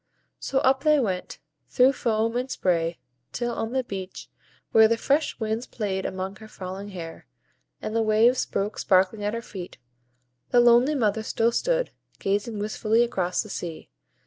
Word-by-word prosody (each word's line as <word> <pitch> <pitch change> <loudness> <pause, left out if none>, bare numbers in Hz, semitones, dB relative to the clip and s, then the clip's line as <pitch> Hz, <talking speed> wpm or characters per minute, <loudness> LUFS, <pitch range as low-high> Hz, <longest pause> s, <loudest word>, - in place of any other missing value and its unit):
So 270 - -2
up 265 +1 +3
they 305 -1 +5
went, 190 -8 -2 0.3
through 260 +1 +4
foam 225 -2 0
and 250 +2 -1
spray, 170 -6 0 0.3
till 240 -1 -2
on 225 0 -3
the 260 0 0
beach, 190 -5 -7 0.4
where 220 0 +7
the 230 +1 +1
fresh 285 +6 0
winds 220 +2 -2
played 195 -4 -3
among 190 +1 -5
her 220 - -12
falling 190 0 -7
hair, 170 -4 -8 0.6
and 215 - -3
the 230 - +3
waves 225 +3 +3
broke 205 +2 -2
sparkling 190 +2 +2
at 210 +2 -1
her 230 - -4
feet, 185 -5 -8 0.7
the 245 - +4
lonely 240 +5 +5
mother 220 -4 +1
still 225 +1 +1
stood, - - 0 0.3
gazing 205 +3 -1
wistfully 215 +2 +1
across 185 -6 -1
the 215 - -12
sea. 170 -4 -6
220 Hz, 165 wpm, -25 LUFS, 195-240 Hz, 0.7 s, where